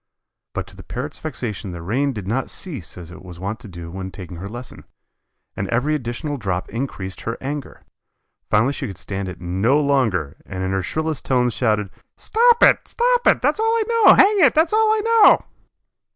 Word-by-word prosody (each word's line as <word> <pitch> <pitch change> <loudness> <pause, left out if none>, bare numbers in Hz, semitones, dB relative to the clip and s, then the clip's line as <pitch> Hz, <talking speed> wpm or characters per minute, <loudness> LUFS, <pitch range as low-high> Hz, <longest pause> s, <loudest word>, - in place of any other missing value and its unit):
But - - -2
to - - -16
the - - -11
Parrot's - - -6
vexation 100 -3 -5
the 85 - -7
rain 130 +10 0
did 105 -7 -7
not 125 +6 -1
cease 135 - -5
as 85 -1 -10
it 90 - -12
was 90 -2 -10
wont 100 +5 -4
to 120 - -11
do 85 -3 -9
when 95 +1 -6
taking 90 -2 -9
her 95 +3 -6
lesson, 120 +3 -9 0.7
and 100 - -3
every 125 +8 0
additional 145 +2 -3
drop 95 -6 -3
increased 105 -6 -5
her 115 - -4
anger. 140 +1 -6 0.7
Finally 115 +7 +3
she - - -4
could 95 - -8
stand 95 -1 -4
it 90 - -9
no 95 - +1
longer, 120 - +1
and 95 0 -5
in 95 - -1
her 95 0 0
shrillest 155 - -3
tones 125 -2 +2
shouted: 105 -5 0 0.3
"Stop 475 +1 +3
it, - - +5
stop - - +1
it! - - +4
That's - - +2
all 450 +1 +2
I 455 - +2
know, 460 -2 +6
hang 410 +1 +5
it, 285 -9 +5
that's 320 +5 +3
all 435 0 +4
I 435 0 +2
know!" 455 -1 +6
120 Hz, 200 wpm, -21 LUFS, 95-155 Hz, 0.7 s, know